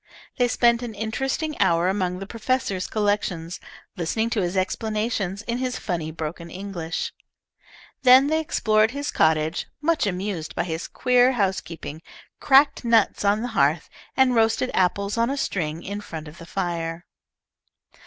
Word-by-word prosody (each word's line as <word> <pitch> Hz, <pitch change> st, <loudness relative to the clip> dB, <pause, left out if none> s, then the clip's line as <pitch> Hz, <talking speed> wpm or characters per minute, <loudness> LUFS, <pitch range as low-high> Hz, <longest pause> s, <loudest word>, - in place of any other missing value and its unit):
They 245 Hz, -, +3 dB
spent 235 Hz, -1 st, +3 dB
an 235 Hz, -3 st, -6 dB
interesting 270 Hz, +8 st, -2 dB
hour 170 Hz, -2 st, +3 dB
among 185 Hz, -2 st, 0 dB
the 195 Hz, -, -6 dB
professor's 215 Hz, -3 st, -1 dB
collections, 200 Hz, -5 st, -1 dB, 0.4 s
listening 220 Hz, +7 st, -1 dB
to 220 Hz, -, +1 dB
his 180 Hz, +1 st, -1 dB
explanations 210 Hz, 0 st, -1 dB
in 235 Hz, +2 st, -2 dB
his 255 Hz, -1 st, -2 dB
funny 170 Hz, -6 st, -3 dB
broken 165 Hz, +1 st, -6 dB
English. 180 Hz, -2 st, -4 dB, 0.9 s
Then 260 Hz, +1 st, +7 dB
they 315 Hz, +2 st, +1 dB
explored 220 Hz, -8 st, +2 dB
his 285 Hz, +3 st, -4 dB
cottage, 160 Hz, +1 st, +1 dB
much 310 Hz, -5 st, +1 dB
amused 185 Hz, -3 st, -3 dB
by -, -, 0 dB
his 165 Hz, -1 st, -4 dB
queer 250 Hz, 0 st, +3 dB
housekeeping, 185 Hz, -, -3 dB, 0.4 s
cracked 280 Hz, 0 st, +4 dB
nuts 230 Hz, -4 st, +3 dB
on 205 Hz, +2 st, +2 dB
the 245 Hz, -, -2 dB
hearth, 155 Hz, -7 st, +1 dB, 0.3 s
and 265 Hz, -1 st, +5 dB
roasted 225 Hz, +2 st, +2 dB
apples 200 Hz, +4 st, +1 dB
on 230 Hz, +1 st, +2 dB
a 280 Hz, -, -2 dB
string 165 Hz, -, -2 dB
in 205 Hz, +1 st, -5 dB
front 160 Hz, -5 st, -8 dB
of 150 Hz, +3 st, -12 dB
the 170 Hz, -, -11 dB
fire. 170 Hz, -2 st, -3 dB
205 Hz, 150 wpm, -24 LUFS, 175-240 Hz, 0.9 s, Then